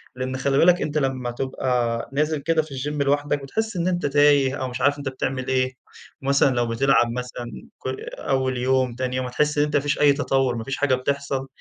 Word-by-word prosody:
لأن 130 Hz, +1 st, -3 dB
خلِّ 135 Hz, +1 st, +1 dB
بالك 180 Hz, +1 st, +5 dB
أنت 150 Hz, 0 st, -2 dB
لمّا 130 Hz, -3 st, -1 dB
تبقى 120 Hz, -2 st, -1 dB
نازل 150 Hz, +2 st, +1 dB
كده 165 Hz, +2 st, +1 dB
في 155 Hz, -2 st, -12 dB
الجيم 145 Hz, +2 st, -3 dB
لوحدَك، 145 Hz, 0 st, 0 dB
بتحس 220 Hz, +10 st, -3 dB
إن 170 Hz, +1 st, 0 dB
أنت 175 Hz, -1 st, 0 dB
تايه 145 Hz, -2 st, +4 dB
أو 130 Hz, -, -1 dB
مش 125 Hz, +1 st, -6 dB
عارف 145 Hz, +2 st, +3 dB
أنت 140 Hz, -1 st, -3 dB
بتعمل 130 Hz, 0 st, -3 dB
إيه، 130 Hz, -1 st, +1 dB, 0.5 s
مثلًا 140 Hz, -1 st, +3 dB
لو 120 Hz, -1 st, +1 dB
بتلعب 120 Hz, 0 st, +2 dB
مثلًا 125 Hz, 0 st, -5 dB, 0.4 s
كُ -, -, -4 dB, 0.3 s
أول 130 Hz, -1 st, 0 dB
يوم 130 Hz, -1 st, +1 dB
تاني 125 Hz, 0 st, -2 dB
يوم 130 Hz, 0 st, -1 dB
هتحس 150 Hz, +4 st, 0 dB
إن 145 Hz, -, +4 dB
أنت 150 Hz, 0 st, -3 dB
ما 145 Hz, -, +4 dB
فيش 145 Hz, 0 st, -1 dB
أي 145 Hz, -1 st, +6 dB
تطور، 135 Hz, -3 st, +1 dB
ما 115 Hz, -, -4 dB
فيش 135 Hz, +3 st, -4 dB
حاجة 140 Hz, -3 st, +2 dB
بتحصل، 135 Hz, +1 st, -2 dB
135 Hz, 210 wpm, -23 LUFS, 130-145 Hz, 0.5 s, أي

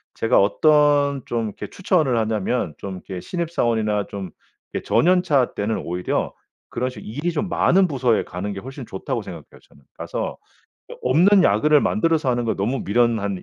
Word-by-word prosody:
제가 115 Hz, +2 st, +2 dB
어떤 145 Hz, +3 st, +3 dB
좀 115 Hz, -1 st, -2 dB
이렇게 105 Hz, -, -7 dB
추천을 160 Hz, -, +1 dB
하냐면 110 Hz, -4 st, -1 dB
좀 100 Hz, -1 st, -6 dB
이렇게 90 Hz, 0 st, -7 dB
신입사원이나 115 Hz, -, -1 dB
좀 95 Hz, -3 st, -7 dB, 0.4 s
이 -, -, -1 dB
저년차 175 Hz, -7 st, +2 dB
때는 105 Hz, +2 st, -2 dB
오히려 90 Hz, +1 st, -2 dB, 0.3 s
그런 125 Hz, +1 st, -2 dB
식 125 Hz, -4 st, -10 dB
일이 145 Hz, +11 st, -2 dB
좀 165 Hz, +4 st, -2 dB
많은 185 Hz, +2 st, +3 dB
부서에 130 Hz, -7 st, +1 dB
가는 95 Hz, +4 st, -5 dB
게 100 Hz, -, -5 dB
훨씬 130 Hz, +4 st, -9 dB
좋다고 115 Hz, +4 st, -4 dB
생각해요 85 Hz, -7 st, -11 dB
저는. 70 Hz, -, -22 dB, 0.2 s
가서 -, -, -4 dB, 0.6 s
어 -, -, -8 dB
없는 180 Hz, +10 st, +5 dB
야근을 145 Hz, +9 st, +4 dB
만들어서 165 Hz, -8 st, +1 dB
하는 120 Hz, -1 st, 0 dB
건 110 Hz, -, 0 dB
너무 115 Hz, +7 st, -2 dB
미련한 105 Hz, -3 st, +1 dB
120 Hz, 355 characters per minute, -22 LUFS, 105-150 Hz, 0.6 s, 없는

